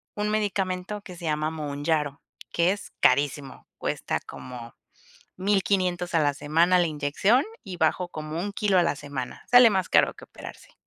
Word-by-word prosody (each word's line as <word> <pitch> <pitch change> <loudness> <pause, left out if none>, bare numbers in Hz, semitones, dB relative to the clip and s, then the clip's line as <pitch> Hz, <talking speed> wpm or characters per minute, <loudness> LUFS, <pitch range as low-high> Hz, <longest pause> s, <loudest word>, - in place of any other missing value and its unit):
un 210 0 -1
medicamento 205 -1 -2
que 185 -3 -11
se 170 - -9
llama 155 0 0
Monjaro, 150 -1 -2 0.3
que 170 +2 +2
es 205 - -6
carísimo, 140 +1 +1
cuesta - - -2
como 120 -2 -10 0.6
1500 185 -2 0
a 165 - +4
la 145 -1 +2
semana 165 +5 +3
la 175 - +3
inyección, 155 - +1 0.2
y 190 -4 -7
bajo 175 +2 +1
como 155 -1 -6
un 200 +4 -3
kilo 200 -2 +2
a - - +5
la 170 - +1
semana, 140 -3 -6
sale 245 -1 +9
más 190 -2 0
caro - - +4
que - - -13
operarse. - - -12
170 Hz, 165 wpm, -26 LUFS, 150-195 Hz, 0.6 s, sale